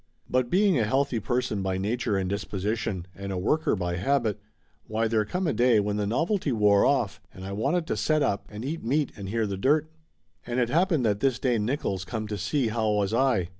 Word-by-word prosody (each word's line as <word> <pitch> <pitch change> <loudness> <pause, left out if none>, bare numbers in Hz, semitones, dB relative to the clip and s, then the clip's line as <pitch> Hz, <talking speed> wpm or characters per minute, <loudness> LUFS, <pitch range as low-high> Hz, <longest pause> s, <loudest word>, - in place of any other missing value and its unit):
But 125 -1 +1
being 190 -4 +3
a - - +3
healthy 135 +2 +1
person 120 -3 -1
by 95 -1 -1
nature 105 +2 -1
and 95 -1 -1
disposition, 100 0 -2
and 100 +3 -6
a 95 - -2
worker 150 +12 +1
by 90 -2 -2
habit, 115 0 0 0.5
why 110 +1 0
there 110 -1 +2
come 180 - -2
a 160 - +1
day 120 0 +4
when 105 0 -1
the 105 -1 -1
novelty 160 - 0
wore 105 -3 +4
off - - 0
and 95 - -10
I 95 - -5
wanted 140 - 0
to 210 - -2
set 155 -1 +1
up 100 - -1
and 105 +3 -7
eat 160 +4 -4
meat 140 +5 0
and 100 -3 -7
hear 115 +1 0
the 100 -2 -3
dirt. 150 +8 +2 0.5
And 120 +1 -2
it 120 -1 +1
happened 165 -3 +2
that 105 -2 +1
this 135 -1 +1
day 125 -3 +1
Nick 130 +8 -2
oils 95 -1 -1
come 110 +1 -4
to 105 - -3
see 130 - 0
how 110 -1 0
was 105 0 0
I. 115 -8 +2
115 Hz, 225 wpm, -27 LUFS, 100-135 Hz, 0.5 s, day